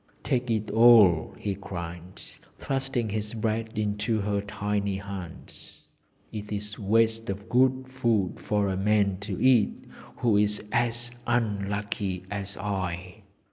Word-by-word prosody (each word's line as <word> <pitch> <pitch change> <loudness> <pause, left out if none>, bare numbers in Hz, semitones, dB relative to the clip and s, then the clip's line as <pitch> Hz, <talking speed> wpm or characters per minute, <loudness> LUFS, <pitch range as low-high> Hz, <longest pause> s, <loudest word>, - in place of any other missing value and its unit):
'Take 125 -1 0
it 110 -1 -1
all!' 110 -8 +6
he 100 - -2
cried, 85 -2 -7 0.4
thrusting 135 -4 -2
his 105 +1 -3
bread 110 0 -2
into 105 +1 0
her 100 0 0
tiny 100 0 -2
hands. 95 -4 -8 0.5
'It 105 -1 -6
is 105 0 -4
waste 115 +2 +2
of 100 +2 -4
good 130 +2 +3
food 115 -8 0
for 105 -2 0
a 95 - -1
man 100 0 +2
to 100 -2 -5
eat 130 -4 +3 0.3
who 115 -4 +3
is 105 0 +1
as 120 0 0 0.2
unlucky 100 -4 -1
as 100 -1 -4
I.' 95 0 -4
105 Hz, 130 wpm, -27 LUFS, 100-115 Hz, 0.5 s, all